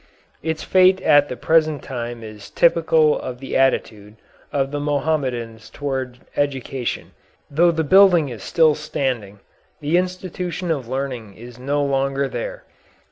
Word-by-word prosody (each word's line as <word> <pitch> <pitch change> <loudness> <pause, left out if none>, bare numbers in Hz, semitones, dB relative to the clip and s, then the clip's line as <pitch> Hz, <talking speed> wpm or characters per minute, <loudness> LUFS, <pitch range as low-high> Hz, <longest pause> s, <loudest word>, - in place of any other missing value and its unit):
Its 160 0 -3
fate 185 0 +4
at 145 0 +5
the - - -4
present 155 -2 +2
time 120 -2 -6
is 110 -2 -10
typical 160 -2 +3
of 125 -1 -6
the 135 - -6
attitude 110 -5 0 0.4
of 135 -1 -1
the 145 - -2
Mohammedans 130 -7 -2
towards 130 -2 -4 0.2
education. 135 -3 -2 0.4
Though 170 +5 +4
the 160 -1 0
building 180 -1 +6
is 115 -5 -8
still 160 - +3
standing, 125 -9 -3 0.4
the 155 +3 +1
institution 180 -1 -4
of 135 -7 -2
learning 125 -6 -4
is 120 +1 -12
no 145 +3 0
longer 135 0 0
there. - - -5
140 Hz, 135 wpm, -21 LUFS, 125-160 Hz, 0.4 s, building